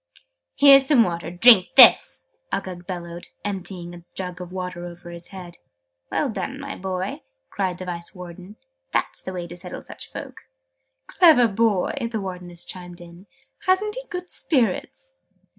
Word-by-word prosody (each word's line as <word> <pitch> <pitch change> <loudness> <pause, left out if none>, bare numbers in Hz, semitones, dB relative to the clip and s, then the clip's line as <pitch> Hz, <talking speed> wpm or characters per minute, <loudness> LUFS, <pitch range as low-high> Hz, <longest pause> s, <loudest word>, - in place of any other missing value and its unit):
"Here's 275 -1 +7
some 270 -6 +5
water, 170 -4 -4
drink 185 +2 +6
this!" - - +8 0.3
Uggug 180 -2 -5
bellowed, 175 -2 -7 0.2
emptying 185 -3 -5
a 175 -1 -12
jug 180 -1 -5
of 180 0 -8
water 180 -1 -6
over 175 0 -10
his 170 0 -8
head. 180 -3 -11 0.5
"Well 295 - 0
done, 270 +5 -5
my 280 0 -6
boy!" 185 0 -4 0.3
cried 185 -3 -2
the 185 - -7
Vice 170 0 -7
Warden. 180 +2 -11 0.4
"That's - - -1
the 185 - -6
way 180 -2 -5
to 175 0 -10
settle 175 - -8
such - - -10
folk!" - - -9 0.6
"Clever 315 -10 +5
boy!", 215 -3 +1 0.2
the 220 - -2
Wardeness 180 -3 -7
chimed 180 -1 -9
in. 175 +3 -14 0.4
"Hasn't 405 +3 +2
he - - -8
good 360 0 -6
spirits?" 300 - -1
185 Hz, 155 wpm, -23 LUFS, 175-230 Hz, 0.6 s, this